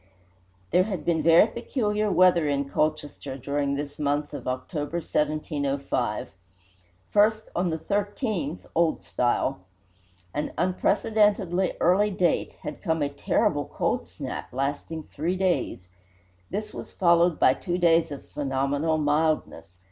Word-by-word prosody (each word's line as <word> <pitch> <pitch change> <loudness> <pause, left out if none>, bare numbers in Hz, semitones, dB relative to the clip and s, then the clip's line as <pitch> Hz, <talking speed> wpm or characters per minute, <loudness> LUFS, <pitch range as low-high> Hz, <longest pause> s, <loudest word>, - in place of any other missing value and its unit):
There 180 +2 +4
had 190 -8 -4
been 165 -2 +2
very 165 +3 +7
peculiar 215 -2 -1
weather 180 -5 +4
in 140 -1 0
Colchester 145 -2 -2
during 140 +1 -1
this 145 +1 -5
month 145 0 -1
of 140 -4 -6
October, 145 +5 -3
1705. 140 -7 -1 0.8
First, 215 +1 +3
on 175 +1 +1
the 160 - -1
13th 200 - -2
(Old 165 -1 +1
Style), 120 -5 0 0.7
an 150 - -3
unprecedently 190 +1 +2
early 195 +4 +4
date, 185 -3 0
had - - -6
come 160 -5 0
a 140 - 0
"terrible 140 - 0
cold - - -2
snap," - - -6
lasting 145 +4 -3
three 160 +5 -3
days. 180 - -1 0.6
This 215 0 -4
was - - -8
followed 170 -2 +3
by 130 - +6
two 175 +4 -3
days 165 -2 +4
of 140 - -8
phenomenal 145 +2 0
mildness. 150 - 0
160 Hz, 125 wpm, -26 LUFS, 145-185 Hz, 0.8 s, very